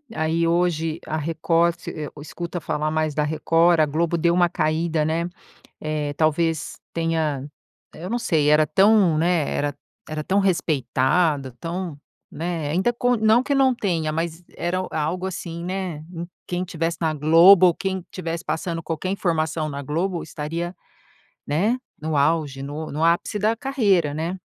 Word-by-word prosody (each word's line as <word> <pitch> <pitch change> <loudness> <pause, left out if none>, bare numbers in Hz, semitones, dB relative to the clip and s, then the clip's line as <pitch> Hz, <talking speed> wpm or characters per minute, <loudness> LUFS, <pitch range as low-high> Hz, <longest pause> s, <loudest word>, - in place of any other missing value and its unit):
aí, 160 +1 +1
hoje 165 -2 +1
a 155 - -2
Record, 165 +2 +1
você, 150 - -6
eh, - - -8
escuta 170 +3 -5
falar 155 -1 -2
mais 155 -1 0
da 150 +1 +1
Record. 165 +2 +3
A - - +5
Globo 165 +3 0
deu 170 +1 +2
uma 175 -1 +3
caída, 155 0 0
né? 165 +2 -1 0.5
Eh, 150 -1 -2
talvez 155 0 0 0.2
tenha 160 -4 -1 0.5
eu 175 +3 -7
não 240 - 0
sei. 155 -9 +2
Era 150 0 +5
tão, 195 -3 +4
né, 165 -2 +2
era 145 0 -1 0.3
era 155 0 -4
tão 195 +6 +2
respeitada, 150 -5 +1
tão, 170 -2 -4 0.3
né, 165 -2 -3
ainda 185 +9 +2
com 245 +1 +1
não 220 +2 +4
que 280 0 0
não 265 -1 +4
tenha, 170 -8 -1
mas 165 +2 -3
era 180 +2 -1
o - - -5
algo, 160 +4 -2
assim, 170 -2 -6
né, 185 -2 -3
em 170 -1 -6 0.2
quem 180 0 -2
estivesse 165 -2 -2
na 160 -2 0
Globo, 165 +5 +7
ou 170 - +2
quem 190 -1 -2
estivesse 170 -1 -5
passando 165 0 -3
qualquer 165 +3 -3
informação 160 -4 -1
na 140 -1 -5
Globo 170 +5 -2
estaria, 165 +4 -4 0.7
né, 200 - +1 0.2
no 155 +1 -2
auge, 145 -2 +1
no 150 +3 -5
no 150 +3 -3
ápice 170 +5 +2
da 215 +3 +1
carreira, 205 - +1
né? 165 +5 -3
165 Hz, 165 wpm, -23 LUFS, 155-180 Hz, 0.7 s, Globo